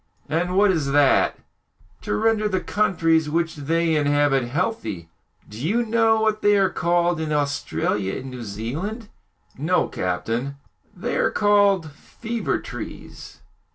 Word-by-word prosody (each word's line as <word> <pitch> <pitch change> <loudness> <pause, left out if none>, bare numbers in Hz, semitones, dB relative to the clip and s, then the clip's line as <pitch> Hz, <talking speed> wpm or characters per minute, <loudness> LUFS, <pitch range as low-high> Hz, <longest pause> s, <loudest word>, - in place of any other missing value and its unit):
"And 175 +4 -1
what 205 0 +5
is 145 -6 -1
that?" 145 -2 +4 0.6
"To 105 - -2
render 215 - +1
the 190 -2 0
countries 165 -7 +1
which 165 +1 -1
they 165 +3 0
inhabit 145 -3 +2
healthy. 120 - -3 0.4
Do 105 - -10
you 230 +9 +1
know 225 -1 +3
what 215 -1 +1
they 205 0 +4
are 190 -2 +2
called 175 0 +1
in 155 -1 -3
Australia 140 -9 -1
and 130 0 -7
New 125 -2 -7
Zealand?" 150 - -5 0.5
"No, 175 +6 +1
captain." 115 +10 -3 0.4
"They - - -2
are - - +2
called 200 -6 +3
'fever 230 - -4
trees.'" - - -9
165 Hz, 135 wpm, -23 LUFS, 140-205 Hz, 0.6 s, what